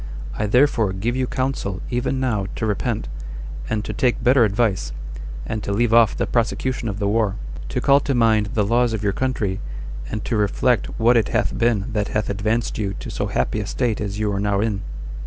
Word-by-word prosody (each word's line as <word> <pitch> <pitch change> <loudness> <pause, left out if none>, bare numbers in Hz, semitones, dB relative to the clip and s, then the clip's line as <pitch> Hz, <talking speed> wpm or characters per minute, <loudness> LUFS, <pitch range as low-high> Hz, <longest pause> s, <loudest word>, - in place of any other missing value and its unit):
I 105 - -1
therefore 115 -4 +3
give 110 +6 -1
you 130 -1 0
counsel 130 -8 -2
even 125 +2 0
now 110 -7 0
to - - -2
repent, 105 -3 -1 0.6
and 110 -1 -1
to - - -4
take 130 -4 +1
better 125 0 +6
advice, 100 - +1 0.5
and 110 - -3
to 100 - -3
leave 115 +3 +2
off 115 -2 +5
the - - +1
prosecution 120 0 0
of 100 - -4
the 100 -1 0
war; 105 -1 +1 0.3
to 125 - -1
call 140 +2 +5
to 140 -2 -1
mind 110 -3 +3
the 105 -2 +2
laws 120 +2 +2
of 110 -2 -2
your 100 -1 +1
country, 105 -7 -1 0.5
and 105 0 -4
to 115 - -1
reflect 105 +3 +2
what 120 +2 +5
it 110 - +2
hath - - 0
been 115 -1 +1
that 105 -2 0
hath 105 -1 -1
advanced 110 +4 -1
you 100 -2 -1
to - - -7
so - - -2
happy 65 +12 0
a 105 - -3
state 115 -3 -1
as 100 -1 -3
you 105 -1 0
are 100 - -1
now 100 -1 +1
in." 105 -2 0
110 Hz, 210 wpm, -22 LUFS, 100-120 Hz, 0.6 s, better